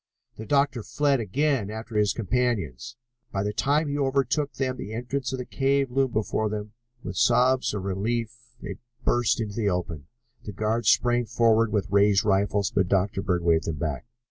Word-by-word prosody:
The 110 - -8
doctor 140 -3 +2
fled 140 +4 +1
again 125 0 0
after 110 +1 -7
his 105 -2 +3
companions. 115 - -2 0.4
By 95 - -1
the 105 0 -2
time 145 +6 +1
he 145 0 -2
overtook 140 +1 0
them 130 -2 -2
the 105 - -7
entrance 125 +2 -3
of 130 - -3
the 125 - -5
cave 135 0 0
loomed 135 -1 +1
before 110 0 0
them. 105 0 -5 0.3
With 90 0 -6
sobs 125 +3 +3
of 100 - -4
relief 110 +5 -2 0.2
they - - -7 0.3
burst 120 -1 +2
out - - +1
into 105 -2 -7
the 105 -3 +1
open. 85 -6 -3 0.4
The 105 - -7
guards 110 +2 0
sprang 120 -1 +3
forward 115 0 +3
with 100 -2 -1
raised 100 0 +4
rifles, 100 -1 +1
but 95 - +1
Dr. 95 +1 +1
Bird 90 -2 -1
waved 80 -1 +2
them 80 -2 -3
back. 75 - -3
110 Hz, 185 wpm, -26 LUFS, 100-125 Hz, 0.4 s, raised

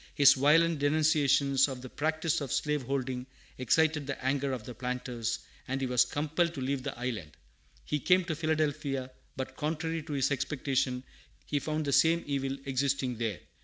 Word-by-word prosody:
His 140 -1 +8
violent 155 +3 +4
denunciations 145 -2 +3
of 130 -2 -6
the 130 - -7
practice 155 +1 0
of 135 -4 -4
slaveholding 135 -3 -1 0.3
excited 150 +3 +2
the 145 - -4
anger 135 +1 +1
of 125 -4 -4
the 125 - -8
planters, 120 -1 -3 0.3
and 130 +1 -1
he 135 - -1
was 125 -1 +3
compelled 160 +3 -1
to - - -5
leave 135 +1 -1
the - - -5
island. 115 -11 -4 0.5
He 150 - -1
came 180 +3 +3
to 165 - -2
Philadelphia, 150 -4 -1 0.2
but, 130 0 -5
contrary 160 +2 -2
to 155 -1 -7
his 135 0 +1
expectations, 135 -2 -1 0.4
he 145 - 0
found 155 +1 -2
the 140 - 0
same 165 +3 +4
evil 135 -1 -2
existing 135 -2 0
there. 110 -5 -2
140 Hz, 165 wpm, -30 LUFS, 130-155 Hz, 0.5 s, His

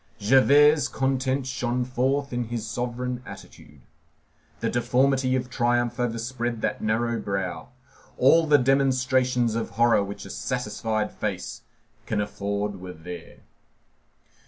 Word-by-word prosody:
Javert's 140 +6 +5
content 135 0 -1
shone 125 -1 -1
forth 135 +2 -1
in 120 0 -1
his 115 -1 -4
sovereign 125 +1 -3
attitude. 75 - -13 0.8
The - - -1
deformity 130 +2 +2
of 125 -1 -1
triumph 120 -1 0
overspread 120 0 -2
that - - -1
narrow 115 +2 0
brow. 95 -3 -3 0.5
All 160 +5 +5
the 150 -1 +6
demonstrations 130 -2 +2
of 115 0 -2
horror 120 -3 +4
which 100 +1 -7
a - - -8
satisfied 110 -1 -2
face 105 +2 -4 0.5
can 110 - -1
afford 100 -1 -3
were 90 -1 -7
there. 85 +1 -10
120 Hz, 120 wpm, -25 LUFS, 110-130 Hz, 0.8 s, the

